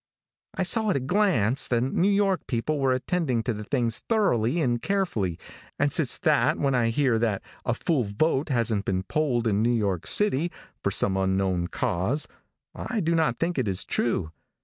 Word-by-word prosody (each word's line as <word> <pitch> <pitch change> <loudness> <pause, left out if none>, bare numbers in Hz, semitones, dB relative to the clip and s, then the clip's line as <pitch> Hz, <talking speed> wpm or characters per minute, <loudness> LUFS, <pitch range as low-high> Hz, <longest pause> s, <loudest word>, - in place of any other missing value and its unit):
"I 190 - 0
saw 220 +3 +2
at - - +1
a - - +1
glance 135 - +1
that 120 -2 +1
New 150 +9 +1
York 200 -2 +1
people 145 +5 -1
were 135 -1 +2
attending 130 -2 0
to 120 - -1
these 105 0 -7
things 120 -4 0
thoroughly 170 - +2
and 120 -6 0
carefully, 115 - -1 0.4
and - - +1
since - - +1
that - - +2
when 140 -2 0
I 120 -2 +2
hear 120 -1 +1
that 110 -4 -1 0.2
'a - - +1
full 145 -9 0
vote 135 +8 0
hasn't 115 -6 0
been 95 -1 -1
polled 125 -1 0
in 105 -2 +1
New 115 - +2
York 100 -7 -1
city' 175 -5 +1 0.3
for - - +2
some 95 - +1
unknown 95 -2 0
cause, 95 - -1 0.5
I 235 - -3
do 170 -3 0
not 160 -7 +1
think 170 -3 -1
it 125 - -1
is 95 -2 0
true. 95 -9 -1
125 Hz, 185 wpm, -26 LUFS, 105-165 Hz, 0.5 s, saw